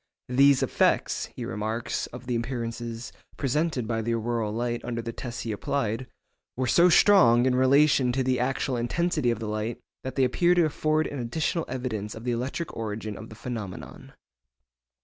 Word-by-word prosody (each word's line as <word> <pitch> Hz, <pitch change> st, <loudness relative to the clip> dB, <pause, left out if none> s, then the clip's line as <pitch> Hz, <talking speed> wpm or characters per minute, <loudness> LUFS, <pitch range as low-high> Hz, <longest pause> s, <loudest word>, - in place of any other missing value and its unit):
'These 135 Hz, +1 st, +5 dB
effects,' -, -, +1 dB
he -, -, -5 dB
remarks 110 Hz, +5 st, -3 dB
of 125 Hz, 0 st, -10 dB
the 125 Hz, -1 st, -1 dB
appearances 115 Hz, -1 st, -4 dB, 0.3 s
presented 140 Hz, -3 st, 0 dB
by 115 Hz, -1 st, -1 dB
the 115 Hz, +1 st, 0 dB
auroral 115 Hz, -1 st, -1 dB
light 120 Hz, +1 st, -2 dB
under 120 Hz, -1 st, -3 dB
the 115 Hz, 0 st, -4 dB
tests 120 Hz, 0 st, -6 dB
he 115 Hz, -, -3 dB
applied, 115 Hz, +2 st, -2 dB, 0.5 s
'were 130 Hz, -, 0 dB
so 170 Hz, +9 st, +5 dB
strong 125 Hz, -, +6 dB
in 130 Hz, -, +3 dB
relation 130 Hz, 0 st, +4 dB
to 130 Hz, +2 st, 0 dB
the 130 Hz, 0 st, +1 dB
actual 130 Hz, +1 st, 0 dB
intensity 150 Hz, +3 st, 0 dB
of 115 Hz, -, 0 dB
the 110 Hz, -, -5 dB
light, 110 Hz, +2 st, -3 dB, 0.2 s
that 130 Hz, -, -5 dB
they 135 Hz, -, +3 dB
appear 175 Hz, +8 st, +3 dB
to 175 Hz, -2 st, +4 dB
afford 155 Hz, 0 st, +1 dB
an 145 Hz, -, -5 dB
additional 155 Hz, +7 st, -1 dB
evidence 120 Hz, -5 st, -4 dB
of 110 Hz, -, -9 dB
the 125 Hz, -, -1 dB
electric 130 Hz, +8 st, -3 dB
origin 110 Hz, -1 st, -4 dB
of 110 Hz, -, -9 dB
the 110 Hz, -, -11 dB
phenomenon. 110 Hz, -6 st, -7 dB
120 Hz, 175 wpm, -27 LUFS, 115-135 Hz, 0.5 s, strong